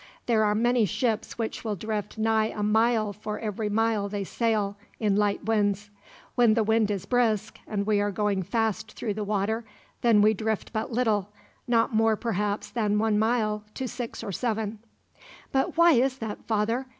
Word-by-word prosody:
There 225 -3 +3
are 210 0 +2
many 240 +1 +3
ships 220 +4 -1
which 225 -2 -3
will 215 -2 -2
drift 210 +2 -4
nigh 220 0 +2
a 210 - -4
mile 220 0 +2
for 210 +1 -5
every 210 -1 -3
mile 215 -1 +1
they 200 0 -3
sail, 210 -1 0 0.2
in 210 -3 +2
light 205 -1 +1
winds. 205 -2 0 0.4
When 235 -3 +4
the 225 - +3
wind 220 0 +2
is 195 -2 -2
brisk, 230 -4 +1
and 200 -2 -2
we 210 -1 +2
are 205 - +1
going 205 -1 0
fast 220 +2 -1
through 215 -3 -3
the 210 +1 -3
water, 210 +2 -1 0.4
then 225 -3 +5
we 215 +1 +5
drift 220 +1 -3
but 220 +3 -2
little, 220 -5 +1 0.4
not 230 0 +2
more 220 0 +3
perhaps 210 -2 -2
than 210 -3 +1
one 215 -1 +2
mile 215 -2 +1
to 260 - -3
six 245 -1 -6
or 200 - -4
seven." 220 0 -2 0.7
"But 270 +4 0
why 340 0 +7
is 260 -1 +3
that, 220 -4 -6
father? 225 +4 0
215 Hz, 180 wpm, -27 LUFS, 210-230 Hz, 0.7 s, why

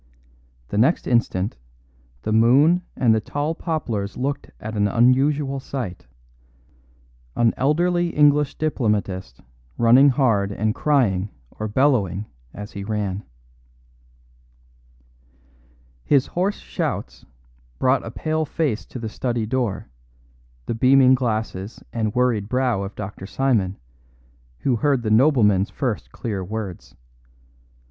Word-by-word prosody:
The 105 - -1
next 140 +10 +3
instant 110 - 0 0.7
the - - -2
moon 135 +11 +5
and 120 -3 +3
the 110 - +1
tall 145 +7 -2
poplars 120 - -3
looked 140 +3 -3
at 110 +1 -6
an 105 0 +2
unusual 135 +5 +2
sight 130 -9 -6 1.3
an 115 -1 +3
elderly 175 +5 +1
English 150 -2 +3
diplomatist 105 - -2 0.4
running 125 +5 +6
hard 115 -7 +2
and 105 +2 -1
crying 105 -11 +1 0.2
or 110 - -5
bellowing 105 - +1 0.3
as 105 +1 -9
he 100 - -6
ran. 105 -2 -3 2.8
His 140 -3 +3
hoarse 190 +4 -1
shouts - - -4 0.5
brought 130 +1 +2
a - - -6
pale 155 +6 -2
face 150 -7 -2
to - - -8
the 115 -2 -4
study 120 0 -2
door, 120 -3 -2 0.8
the - - -2
beaming 130 +2 +5
glasses 110 -5 -2
and 110 -3 -2
worried 120 -5 +1
brow 125 -5 +1
of 100 +1 -6
Dr. 95 -1 -7
Simon, 110 -7 0 0.8
who 125 -3 +1
heard 135 0 +1
the 110 - -1
nobleman's 110 -6 +4
first 125 -6 -3
clear 105 -6 -4
words. 100 -2 -6
120 Hz, 115 wpm, -22 LUFS, 105-135 Hz, 2.8 s, running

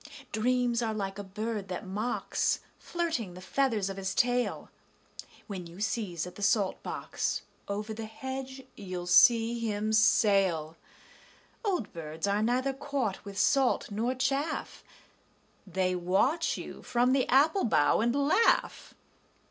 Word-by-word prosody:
Dreams 245 +1 +1
are 220 -2 -1
like 195 -1 -4
a - - -4
bird 210 +1 -4
that 185 0 -5
mocks, 210 +6 -1 0.2
Flirting 320 - -3
the - - -9
feathers 220 +1 0
of 195 0 -5
his 190 -1 -3
tail. 245 0 0 0.7
When 190 -5 -6
you 170 +1 -13
sieze 205 -6 -2
at 180 - -9
the - - -11
salt 200 -1 +1
box, - - -3 0.2
Over 210 +2 -3
the 220 0 -6
hedge 265 +3 -6
you'll 185 -3 -6
see 230 +5 +5
him 215 -1 -1
sail. 195 -7 +3 0.9
Old 365 - -1
birds 160 0 -5
are 200 +1 +1
neither 255 +4 +1
caught 270 -7 -3
with 200 -1 -9
salt 270 -3 +2
nor 230 +5 -1
chaff: 275 +4 -2 0.8
They 185 0 0
watch 195 - +1
you - - -8
from 245 +1 +2
the 270 -2 +2
apple 305 +9 +4
bough 150 -10 +3
and 240 +3 +1
laugh. 285 +11 +2
220 Hz, 140 wpm, -29 LUFS, 195-255 Hz, 0.9 s, see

